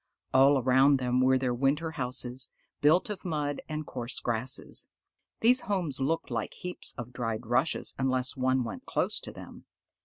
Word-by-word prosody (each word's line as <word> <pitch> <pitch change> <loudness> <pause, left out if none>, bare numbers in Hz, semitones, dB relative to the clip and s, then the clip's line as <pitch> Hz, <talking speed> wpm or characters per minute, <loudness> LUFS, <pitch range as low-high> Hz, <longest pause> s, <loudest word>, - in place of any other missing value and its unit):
All 135 +2 +6
around 135 +2 +4
them 125 0 +1
were 130 0 +4
their 130 -1 0
winter 140 +6 0
houses, 125 -2 -2 0.3
built 160 +8 +4
of 200 - -6
mud 150 -4 -2
and 155 0 -3
coarse 125 -2 -3
grasses. 120 +2 -2 0.5
These 245 +3 +5
homes 175 -9 -2
looked 160 +5 -1
like - - -3
heaps 180 0 -3
of 120 0 -7
dried 115 -1 -3
rushes, 120 +7 +1
unless 130 -1 +1
one 130 -1 +1
went 115 - -7
close - - 0
to - - -7
them. - - -12
130 Hz, 160 wpm, -29 LUFS, 125-150 Hz, 0.5 s, All